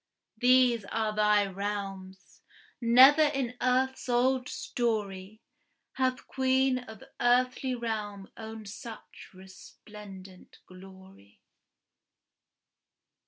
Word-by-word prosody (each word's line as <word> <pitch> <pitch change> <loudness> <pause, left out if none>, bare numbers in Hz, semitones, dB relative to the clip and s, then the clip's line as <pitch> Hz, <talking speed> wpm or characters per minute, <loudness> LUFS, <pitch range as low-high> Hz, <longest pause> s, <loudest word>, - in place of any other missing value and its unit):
These 250 -3 +4
are 215 +1 -2
thy 210 -1 +3
realms. 195 -1 -6 0.4
Never 260 +6 +7
in 275 -5 0
earth's 260 +1 0
old 250 +1 +1
story 210 -3 -3 0.5
Hath 255 -1 -1
queen 260 0 +1
of 220 -4 -12 0.2
earthly 255 +1 +1
realm 210 -4 -5
owned 220 -1 -9
such 225 +2 -11
resplendent 190 0 -14
glory. 190 - -16
220 Hz, 80 wpm, -29 LUFS, 195-255 Hz, 0.5 s, Never